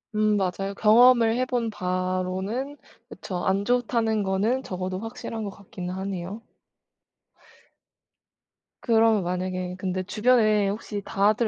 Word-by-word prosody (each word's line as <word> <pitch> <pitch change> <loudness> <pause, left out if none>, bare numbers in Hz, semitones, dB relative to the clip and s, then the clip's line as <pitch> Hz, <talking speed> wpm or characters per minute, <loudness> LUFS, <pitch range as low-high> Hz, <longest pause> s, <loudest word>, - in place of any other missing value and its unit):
음 215 0 +3
맞아요 195 +1 -2
경험을 230 +1 +6
해 255 - +1
본 245 -3 -1
바로는 185 +7 -2 0.3
그쵸 185 -3 -6
안 195 +1 +1
좋다는 230 -3 +1
거는 200 +7 0
적어도 185 -3 -4
확실한 225 0 -6
것 205 - -3
같긴 185 -2 -8
하네요. 190 +2 -5 2.4
그러면 225 -3 +3
만약에 180 0 -3
근데 185 0 -2
주변에 215 -1 +3
혹시 205 0 -4
다들 210 +4 +2
205 Hz, 245 characters per minute, -25 LUFS, 185-225 Hz, 2.4 s, 경험을